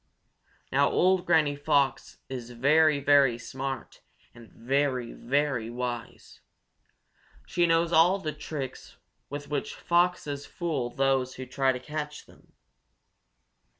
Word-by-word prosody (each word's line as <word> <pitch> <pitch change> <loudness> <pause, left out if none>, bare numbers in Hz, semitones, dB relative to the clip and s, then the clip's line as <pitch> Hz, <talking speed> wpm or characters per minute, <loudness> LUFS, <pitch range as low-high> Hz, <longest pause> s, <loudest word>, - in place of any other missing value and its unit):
Now 140 +1 +3
old 185 0 +2
Granny 155 -4 +3
Fox 140 -1 0
is 125 -3 -6
very, 145 +5 +3
very 140 -4 +4
smart 135 +1 -6 0.3
and 115 -1 -15
very, 130 0 -1
very 135 -3 -1
wise. 120 -1 -6 1.0
She 175 -1 +1
knows 165 0 +2
all 175 +4 +5
the 155 -6 -4
tricks 145 -3 -7 0.3
with 145 0 -6
which 145 -2 -3
foxes 170 -5 0
fool 150 -9 -3
those 135 0 0
who 130 - -7
try 130 +1 +1
to 125 - -4
catch 150 +2 -6
them. - - -22
140 Hz, 115 wpm, -27 LUFS, 130-155 Hz, 1.0 s, all